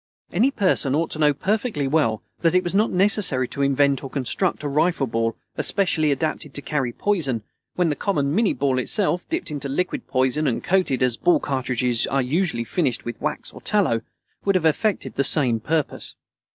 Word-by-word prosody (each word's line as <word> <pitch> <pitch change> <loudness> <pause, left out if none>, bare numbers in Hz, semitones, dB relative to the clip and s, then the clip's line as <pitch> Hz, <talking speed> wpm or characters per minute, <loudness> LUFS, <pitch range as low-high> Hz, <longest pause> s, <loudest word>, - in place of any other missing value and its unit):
Any 225 +10 +3
person 185 - +1
ought 165 +2 0
to 155 - -4
know 150 -1 +5
perfectly 195 - -1
well 135 -7 +1 0.2
that 165 0 +2
it 185 - +4
was 175 - -3
not 210 +3 +3
necessary 185 - +2
to 140 - -4
invent 140 0 +2
or 135 - -5
construct 145 +7 -1
a - - -1
rifle 155 +1 +1
ball 115 -1 -1 0.2
especially 160 -6 +1
adapted 150 0 -2
to 145 - 0
carry 135 -5 -1
poison, 135 - -1 0.3
when 175 -2 +2
the 150 - 0
common 145 -8 0
minnie 215 +2 +2
ball 135 -2 +1
itself, 180 - -1
dipped 335 - -2
into 140 -2 -4
liquid 180 +7 -2
poison 130 +3 +1
and 120 - -1
coated, 175 -9 +1
as 125 -2 +1
ball 175 - +3
cartridges 125 -3 0
are 135 -1 +1
usually 145 -2 0
finished, 130 -1 -1
with 120 -1 -6
wax - - -3
or - - -11
tallow, 165 - +1 0.4
would 195 -1 +2
have 175 -3 +1
effected 195 +6 +1
the 140 - +3
same 130 -5 +1
purpose. 155 +5 -1
150 Hz, 190 wpm, -23 LUFS, 130-180 Hz, 0.4 s, know